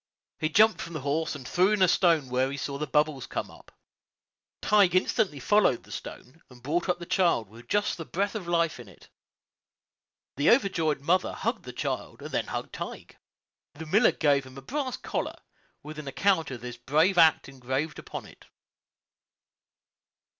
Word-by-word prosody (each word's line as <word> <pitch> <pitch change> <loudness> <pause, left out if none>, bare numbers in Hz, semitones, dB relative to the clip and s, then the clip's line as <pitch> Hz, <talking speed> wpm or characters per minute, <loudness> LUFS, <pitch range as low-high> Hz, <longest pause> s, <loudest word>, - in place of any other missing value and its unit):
He 155 - 0
jumped 215 +6 +4
from 170 - -7
the 155 - -4
horse, 150 +4 -1
and 130 -3 -8
threw 185 +3 +3
in 205 -3 +3
a - - +6
stone 165 -6 +3
where 130 +1 +1
he 140 - -5
saw 140 +1 -4
the 150 - -2
bubbles 150 -1 +1
come - - -4
up. - - -17 0.9
Tige 200 -3 +4
instantly 185 -4 +1
followed 200 - +3
the - - -16
stone, 155 +6 -9
and 125 -2 -17
brought 170 +7 -1
up 180 - +2
the 175 - -8
child 170 - +1
with 115 +3 -15
just 205 0 0
the - - -3
breath 200 +5 -2
of 205 -6 -5
life 170 -4 +1
in 120 - -10
it. 95 - -18 1.3
The 145 +3 +3
overjoyed 165 - +2
mother 180 +6 +1
hugged - - -3
the - - -6
child, - - -4
and - - -7
then - - -1
hugged - - -5
Tige. - - -8 0.6
The 160 +2 -8
miller 210 +9 +4
gave 140 -3 +2
him 130 0 -13
a 135 - -9
brass 265 - -3
collar, - - -3 0.5
with 155 0 -8
an 150 - -8
account 175 +4 +1
of 125 -4 -7
this 125 -1 -7
brave 155 +9 +2
act 160 -2 +5
engraved 135 +3 -3
upon - - -7
it. - - -17
155 Hz, 180 wpm, -27 LUFS, 135-185 Hz, 1.3 s, a